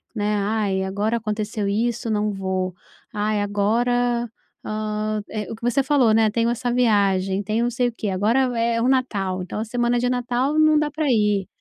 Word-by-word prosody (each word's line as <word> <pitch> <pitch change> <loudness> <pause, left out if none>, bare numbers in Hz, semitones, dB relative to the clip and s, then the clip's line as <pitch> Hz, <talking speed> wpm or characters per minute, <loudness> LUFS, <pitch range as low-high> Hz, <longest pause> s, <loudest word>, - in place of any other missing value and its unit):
né. 210 -1 0
"Ai, 200 -2 0
agora 205 +4 -1
aconteceu 215 -1 -3
isso, 230 +3 -1
não 210 0 0
vou. 190 -2 -2 0.4
Ai, 210 0 0
agora", 235 +4 +1 0.4
hã, 215 0 -2
eh, 215 -1 -5
o - - -4
que - - -19
você 245 +3 +2
falou, 260 -5 +3
né: 220 -1 +4
"Tenho 230 +1 +1
essa 240 +1 -1
viagem. 200 -5 +2
Tenho 215 +4 0
não 240 - -1
sei 245 +1 +1
o - - -12
quê. 215 -2 -3
Agora 220 +8 +2
o 245 - -4
é 230 0 +1
o 245 - +2
Natal, 200 -8 0
então 185 +4 -5
a 220 - -2
semana 240 +1 0
de 245 - 0
Natal 250 +4 0
não 310 -1 +5
dá 300 0 0
para 310 0 -2
ir. 210 -4 +2
220 Hz, 195 wpm, -22 LUFS, 205-240 Hz, 0.4 s, não